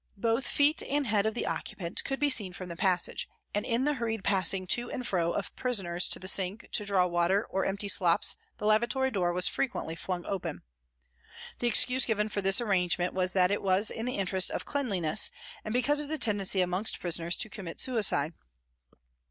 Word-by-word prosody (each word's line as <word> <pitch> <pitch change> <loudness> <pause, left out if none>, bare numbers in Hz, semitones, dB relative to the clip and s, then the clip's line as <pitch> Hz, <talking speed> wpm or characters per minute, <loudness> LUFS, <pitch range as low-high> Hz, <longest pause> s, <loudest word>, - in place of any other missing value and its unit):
Both 230 +5 0
feet 295 +2 +3
and 285 0 -1
head 210 -2 +1
of 220 - -2
the - - -2
occupant 170 -2 -3
could 270 - -3
be 290 0 +2
seen 200 -8 +2
from 180 0 -8
the 170 - -6
passage, 180 0 0 0.2
and 205 - -1
in 235 +2 0
the 295 +1 +1
hurried 225 -5 -3
passing 190 -1 +1
to 240 +6 0
and 250 - -5
fro 170 -5 0
of 200 - -4
prisoners 190 -8 0
to - - +1
the 185 - -9
sink 195 +2 0
to 210 - +2
draw 195 -3 +2
water 175 +3 +1
or 190 - -1
empty 200 +1 -2
slops 180 -3 +3 0.2
the - - -6
lavatory 240 +5 +2
door 180 -5 0
was 180 +1 +3
frequently 245 -11 -2
flung 175 +1 -5
open. 180 -6 -5 1.0
The 240 - 0
excuse 250 +2 +4
given 215 -2 0
for 205 - -2
this 195 0 +4
arrangement 180 -5 0
was 185 0 0
that 185 0 +3
it 205 - -1
was 195 +2 +2
in 225 +2 -4
the 250 - -2
interests 190 -1 +2
of - - -4
cleanliness 210 - +1 0.3
and 215 - -5
because 275 +5 +2
of 295 - -4
the 315 +1 -2
tendency 200 -6 +1
amongst 180 +4 -1
prisoners 170 0 0
to - - +1
commit 195 -5 -8
suicide. 205 - +2
200 Hz, 200 wpm, -29 LUFS, 180-235 Hz, 1.0 s, excuse